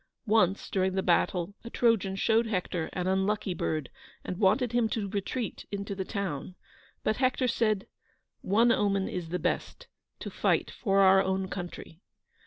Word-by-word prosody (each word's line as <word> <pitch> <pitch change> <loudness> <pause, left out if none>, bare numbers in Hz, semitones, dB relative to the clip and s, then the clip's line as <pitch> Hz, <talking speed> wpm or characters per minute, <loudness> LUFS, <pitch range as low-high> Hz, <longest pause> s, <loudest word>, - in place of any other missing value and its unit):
Once 200 -3 +2
during 190 -1 +1
the 190 - 0
battle 180 +1 +1
a 235 - -7
Trojan 225 -6 +2
showed 225 +3 +2
Hector 180 -5 -2
an 180 -1 -2
unlucky 190 +1 0
bird, 155 -3 -2 0.3
and 180 - -5
wanted 220 +4 +3
him 240 -2 +2
to 215 -2 -2
retreat 205 +4 -4
into 200 0 -4
the 190 -1 -3
town. 185 -4 -4 0.5
But 215 - +1
Hector 255 0 +1
said, 215 -4 +1 0.6
"One 230 +5 +3
omen 200 -3 +1
is 175 -3 -5
the 180 - -1
best: - - -3 0.3
to - - -7
fight - - +1
for 195 -3 +1
our 190 0 +6
own 190 0 -1
country." 175 -2 -7
195 Hz, 160 wpm, -29 LUFS, 185-220 Hz, 0.6 s, our